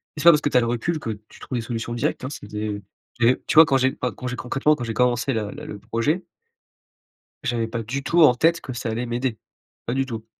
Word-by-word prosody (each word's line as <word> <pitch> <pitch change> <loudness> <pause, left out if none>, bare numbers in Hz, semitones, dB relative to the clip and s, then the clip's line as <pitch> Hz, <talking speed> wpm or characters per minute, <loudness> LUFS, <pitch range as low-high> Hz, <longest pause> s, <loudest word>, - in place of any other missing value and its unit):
et - - -7
c'est - - -3
pas 170 - +10
parce 150 -2 +3
que 145 - +1
tu 130 - +3
as - - +7
le - - 0
recul 120 +8 -1
que 115 - -4 0.2
tu - - -16
trouves 130 - -4
des - - -1
solutions 115 0 -4
directes, 120 - -1
hein, 130 - -3
c'est 135 - -8
des 105 -1 -4 0.4
et 120 +2 +4
tu - - -1
vois 160 +1 +10
quand 135 -2 +3
j'ai 130 0 +2
pas 125 -1 -3
quand 125 - -10
j'ai 125 - -3
concrètement 135 +5 +1
quand 125 - -6
j'ai 115 - -3
commencé 125 +2 +1
la 105 -3 -2
le 150 +1 -9
le 105 -9 -7
projet 150 - -1 1.2
j'avais 120 -4 -1
pas 115 +1 -3
du 130 +6 -4
tout 170 +4 +3
en-tête 160 +4 +5
que 130 - -7
ça 120 -2 -3
allait 115 +2 -2
m'aider. 120 -1 -2 0.5
Pas 120 - -1
du 135 0 +1
tout. 115 -3 -6
125 Hz, 265 wpm, -23 LUFS, 115-140 Hz, 1.2 s, pas